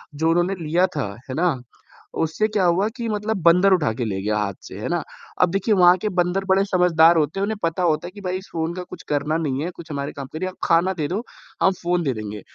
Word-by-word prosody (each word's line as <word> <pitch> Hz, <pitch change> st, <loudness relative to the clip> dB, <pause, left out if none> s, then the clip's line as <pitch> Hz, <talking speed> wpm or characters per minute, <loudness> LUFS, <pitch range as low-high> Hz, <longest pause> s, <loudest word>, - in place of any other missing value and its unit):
जो 160 Hz, +2 st, +1 dB
उन्होंने 175 Hz, +3 st, +2 dB
लिया 175 Hz, +5 st, +2 dB
था, 145 Hz, -8 st, -3 dB, 0.2 s
है 130 Hz, -, -3 dB
ना? 170 Hz, -3 st, +2 dB, 0.6 s
उससे 165 Hz, +7 st, 0 dB
क्या 210 Hz, -3 st, 0 dB
हुआ 180 Hz, +4 st, +3 dB
कि 235 Hz, -1 st, -3 dB
मतलब 210 Hz, 0 st, -1 dB
बंदर 180 Hz, +3 st, +6 dB
उठा 150 Hz, -11 st, +2 dB
के 120 Hz, +1 st, -3 dB
ले 95 Hz, -2 st, -3 dB
गया 105 Hz, +1 st, 0 dB
हाथ 100 Hz, -2 st, -1 dB
से, -, -, -9 dB
है -, -, -4 dB
ना? -, -, 0 dB, 0.4 s
अब 180 Hz, -, +5 dB
देखिए 195 Hz, +3 st, +1 dB
वहाँ 180 Hz, 0 st, +6 dB
के 215 Hz, -, 0 dB
बंदर 180 Hz, +1 st, 0 dB
बड़े 195 Hz, +1 st, +4 dB
समझदार 170 Hz, -3 st, +4 dB
होते 155 Hz, +5 st, 0 dB
हैं, -, -, 0 dB
उन्हें 215 Hz, +1 st, -1 dB
पता 165 Hz, +2 st, 0 dB
होता 160 Hz, 0 st, +1 dB
है -, -, -9 dB
कि 205 Hz, +1 st, -12 dB
भई 185 Hz, 0 st, -2 dB
इस 190 Hz, -, -11 dB
फ़ोन 165 Hz, +1 st, -2 dB
का 180 Hz, -, -5 dB
कुछ -, -, -11 dB
करना 150 Hz, +2 st, 0 dB
नहीं 145 Hz, -3 st, -2 dB
है, 175 Hz, -, -2 dB
कुछ 165 Hz, -2 st, -10 dB
हमारे 140 Hz, 0 st, -3 dB
काम 140 Hz, -2 st, -7 dB
का 155 Hz, -, -6 dB
नहीं 185 Hz, -, -2 dB
है, -, -, -4 dB
आप -, -, -22 dB
खाना 175 Hz, +3 st, +3 dB
दे 155 Hz, -4 st, -2 dB
दो, 195 Hz, +7 st, -2 dB, 0.4 s
हम 190 Hz, -, +5 dB
फ़ोन 175 Hz, 0 st, +1 dB
दे 135 Hz, -3 st, 0 dB
देंगे। 105 Hz, -2 st, -6 dB
175 Hz, 270 wpm, -22 LUFS, 150-190 Hz, 0.6 s, बंदर